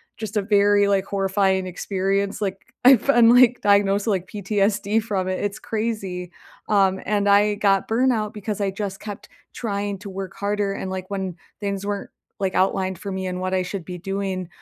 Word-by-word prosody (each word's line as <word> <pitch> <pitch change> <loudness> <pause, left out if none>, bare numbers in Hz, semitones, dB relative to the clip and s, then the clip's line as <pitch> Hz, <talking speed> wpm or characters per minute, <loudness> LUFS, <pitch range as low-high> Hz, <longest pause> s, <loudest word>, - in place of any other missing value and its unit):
just 215 0 -5
a - - +3
very, 205 0 +3
like, 195 -1 +2
horrifying 195 -1 +1
experience, 195 +2 -1
like, 200 +3 -4
I've 255 -4 +7
been, 240 -4 +6
like, 245 0 +6
diagnosed 200 0 +3
with, - - +3
like, 185 -2 -1
PTSD 205 +1 0
from 195 -4 -2
it; 185 - -2
it's 205 0 -3
crazy. 200 -6 -3 0.4
Um, 195 -2 +3
and 205 0 +1
I 205 +1 +4
got 195 -1 +2
burnout 225 -2 +1
because 210 -1 -4
I 195 -1 0
just 195 -1 -5
kept 205 -2 -8 0.3
trying 200 -3 -3
to 205 -1 -8
work 190 -1 -6
harder. 205 0 -1
And, 190 - -5
like, 185 0 -5
when 190 -3 -3 0.2
things 200 -1 -3
weren't, 205 -1 -3 0.3
like, 190 -2 -1
outlined 190 0 +1
for 200 - -6
me 190 0 -3
and 180 0 -3
what 185 0 -2
I 185 - +2
should 180 -1 -5
be 180 -1 -6
doing, 195 -1 -3
200 Hz, 190 wpm, -23 LUFS, 190-210 Hz, 0.4 s, I've